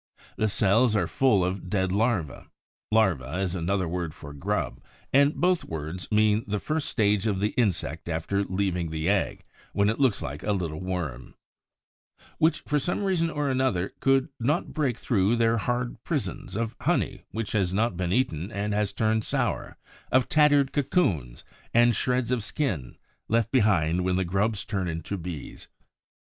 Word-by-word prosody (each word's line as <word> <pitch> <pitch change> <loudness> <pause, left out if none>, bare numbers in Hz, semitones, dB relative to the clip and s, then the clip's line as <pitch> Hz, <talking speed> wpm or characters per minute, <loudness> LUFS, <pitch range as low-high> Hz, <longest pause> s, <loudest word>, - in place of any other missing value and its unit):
The 110 - +1
cells 105 +3 +3
are - - +2
full 110 -9 +3
of 90 0 -3
dead 95 -1 0
larvæ 100 - 0 0.4
(larva 95 -9 +2
is 95 -2 -1
another 95 +1 0
word 85 -2 -3
for 75 -3 -10
grub, 70 - -2 0.3
and 140 +2 +5
both 180 0 +2
words 80 +5 -6
mean 105 0 +3
the 105 0 -1
first 155 +7 -2
stage 105 -2 +2
of 100 -3 0
the 105 +2 +1
insect 85 -8 -1
after 85 +5 -1
leaving 95 -3 -1
the 80 0 -2
egg, 100 0 0 0.3
when 100 +1 +3
it 110 - -2
looks 130 -7 +3
like 70 +2 -5
a 105 - 0
little 85 -5 -3
worm), 85 -10 -4 1.0
which, 160 +1 +3
for 150 0 0
some 175 +8 -2
reason 180 -4 +1
or 150 -3 -1
other, 130 -9 0
could 135 +2 +3
not 145 +8 0
break 135 -7 0
through 110 -2 +2
their 115 0 +2
hard 120 0 -2
prisons; 130 - -3
of 115 +1 -2
honey - - 0
which 110 -2 -4
has 95 -5 +1
not 105 +1 +1
been 90 0 -2
eaten 95 - 0
and 105 0 -2
has 105 -1 0
turned 110 0 +1
sour; - - -2 0.3
of 130 -1 +3
tattered 145 -3 +4
cocoons, 95 - 0 0.3
and 120 -1 +5
shreds 125 -1 0
of 125 -4 0
skin, 100 - -2 0.3
left 115 0 +1
behind 90 - +3
when 90 0 +1
the 95 0 +1
grubs 100 +4 0
turned 100 -3 -2
into 80 +5 -4
Bees. 85 -5 -7
105 Hz, 165 wpm, -26 LUFS, 90-120 Hz, 1.0 s, and